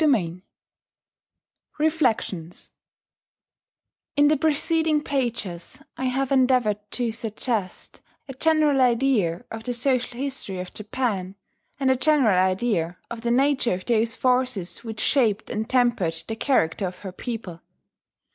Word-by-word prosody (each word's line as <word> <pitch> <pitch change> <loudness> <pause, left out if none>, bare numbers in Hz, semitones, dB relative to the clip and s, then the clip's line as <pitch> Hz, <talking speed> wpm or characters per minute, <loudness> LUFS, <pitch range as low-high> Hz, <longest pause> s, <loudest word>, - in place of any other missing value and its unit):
REFLECTIONS 245 - -1 1.4
In 290 0 +5
the 310 - +4
preceding 315 +1 +1
pages 235 - -3 0.2
I 260 - -3
have 265 +1 -1
endeavoured 250 -6 +3
to 240 -2 0
suggest 220 -2 -4 0.3
a 270 - -7
general 300 -1 +3
idea 235 -9 +2
of 225 0 -6
the 245 - -2
social 250 0 0
history 260 -8 -4
of 180 0 -7
Japan, 210 -4 -3 0.4
and 265 -1 +3
a - - +3
general 260 -8 +3
idea 185 -2 0
of 230 -1 -5
the 235 - -1
nature 260 -3 +2
of 185 - -8
those 230 -1 +2
forces 250 -8 0
which 220 -2 -6
shaped 225 -6 +1
and 220 +2 -3
tempered 240 -10 +2
the 225 - -3
character 200 - +1
of 180 0 -8
her 190 - -4
people. 195 -5 -6
240 Hz, 125 wpm, -24 LUFS, 200-270 Hz, 1.4 s, In